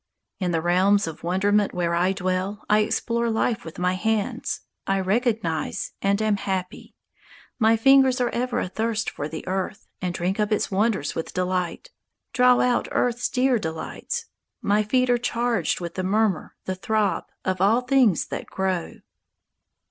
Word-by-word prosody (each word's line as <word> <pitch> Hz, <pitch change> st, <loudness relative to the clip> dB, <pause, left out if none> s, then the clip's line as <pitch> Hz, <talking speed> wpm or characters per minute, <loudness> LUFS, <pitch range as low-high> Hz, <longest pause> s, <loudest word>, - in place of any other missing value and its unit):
In 185 Hz, -2 st, 0 dB
the 165 Hz, -2 st, 0 dB
realms 190 Hz, +4 st, +3 dB
of 160 Hz, -2 st, -7 dB
wonderment 200 Hz, +4 st, +1 dB
where 170 Hz, -1 st, 0 dB
I 175 Hz, +2 st, +2 dB
dwell 190 Hz, +2 st, -2 dB
I 210 Hz, 0 st, +4 dB
explore 235 Hz, +2 st, 0 dB
life 225 Hz, 0 st, 0 dB
with 160 Hz, -, -9 dB
my 180 Hz, +1 st, +1 dB
hands; 215 Hz, +2 st, -1 dB, 0.3 s
I 195 Hz, 0 st, +1 dB
recognize, 205 Hz, -4 st, -1 dB
and 200 Hz, +1 st, +2 dB
am 215 Hz, -2 st, +2 dB
happy; 190 Hz, -2 st, -4 dB, 0.6 s
My 225 Hz, 0 st, +4 dB
fingers 265 Hz, +2 st, +5 dB
are 245 Hz, -, +1 dB
ever 250 Hz, 0 st, -1 dB
athirst 220 Hz, +3 st, -2 dB
for 145 Hz, -, -4 dB
the 160 Hz, +3 st, -7 dB
earth, 190 Hz, +2 st, -3 dB, 0.2 s
And 180 Hz, -2 st, -1 dB
drink 185 Hz, +4 st, -1 dB
up 210 Hz, 0 st, +1 dB
its 210 Hz, -, 0 dB
wonders 195 Hz, -6 st, +1 dB
with 165 Hz, -, -5 dB
delight, 180 Hz, -1 st, -2 dB, 0.4 s
Draw 250 Hz, 0 st, +5 dB
out 250 Hz, -1 st, +1 dB
earth's 245 Hz, 0 st, 0 dB
dear 255 Hz, -2 st, +2 dB
delights; 165 Hz, -, -4 dB, 0.3 s
My 205 Hz, +1 st, +2 dB
feet 250 Hz, +4 st, +2 dB
are 240 Hz, -, +3 dB
charged 240 Hz, 0 st, 0 dB
with 170 Hz, -1 st, -5 dB
the 185 Hz, -, -3 dB
murmur, 200 Hz, -1 st, 0 dB
The 190 Hz, -, -1 dB
throb, 200 Hz, 0 st, 0 dB, 0.2 s
of 185 Hz, -1 st, -1 dB
all 220 Hz, +5 st, +4 dB
things 250 Hz, -, +3 dB
that -, -, -5 dB
grow. 190 Hz, -3 st, -3 dB
200 Hz, 160 wpm, -24 LUFS, 185-230 Hz, 0.6 s, fingers